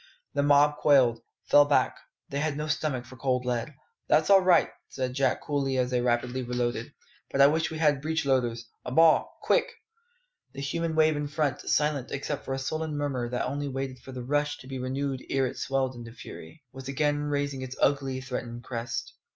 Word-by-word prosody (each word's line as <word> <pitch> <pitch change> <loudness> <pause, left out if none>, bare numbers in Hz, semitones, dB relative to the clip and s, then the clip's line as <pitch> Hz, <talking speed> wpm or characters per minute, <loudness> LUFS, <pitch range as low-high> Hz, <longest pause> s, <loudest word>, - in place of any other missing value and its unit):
The 140 - +1
mob 145 +1 +4
quailed, 130 -6 +4 0.2
fell 145 0 +6
back: 145 - +2 0.3
"they 140 - -2
had 150 -1 -1
no 150 - -2
stomach 150 -5 -1
for 130 +1 -13
cold 125 -2 0
lead. 125 +3 -2 0.3
"That's 155 +5 +3
all 195 -1 +8
right," 185 -2 +4 0.2
said 130 -1 -3
Jack 135 -1 +1
coolly 135 -2 -1
as 125 0 +1
they 125 -1 +1
rapidly 125 +1 0
reloaded; 120 -1 -2 0.4
"but 135 - -2
I 140 - +9
wish 160 +3 +2
we 160 - -5
had 150 -3 +2
breechloaders! 135 -7 0 0.2
A - - -5
ball, 160 +3 +4
quick!" - - +2 0.8
The 140 - -6
human 165 +3 -2
wave 155 -1 +4
in 145 0 -2
front, 145 -3 -1
silent 150 -3 +1
except 140 +1 -4
for 135 - -2
a - - -3
sullen 155 +3 -3
murmur 135 -5 -2
that 125 0 -1
only 145 +2 -3
waited 135 -1 -4
for 135 - -11
the 125 -1 -6
rush 145 +3 0
to 130 - -13
be 135 -1 -5
renewed 130 +1 -3
ere 135 -1 +2
it 125 - -4
swelled 135 -1 -1
into 115 -2 -9
fury, 120 - -11
was 135 -1 -9
again 145 +1 0
raising 145 -2 -2
its 130 0 -6
ugly, 135 -2 +1
threatening 120 -2 -5
crest. 115 -1 -4
135 Hz, 195 wpm, -28 LUFS, 125-145 Hz, 0.8 s, I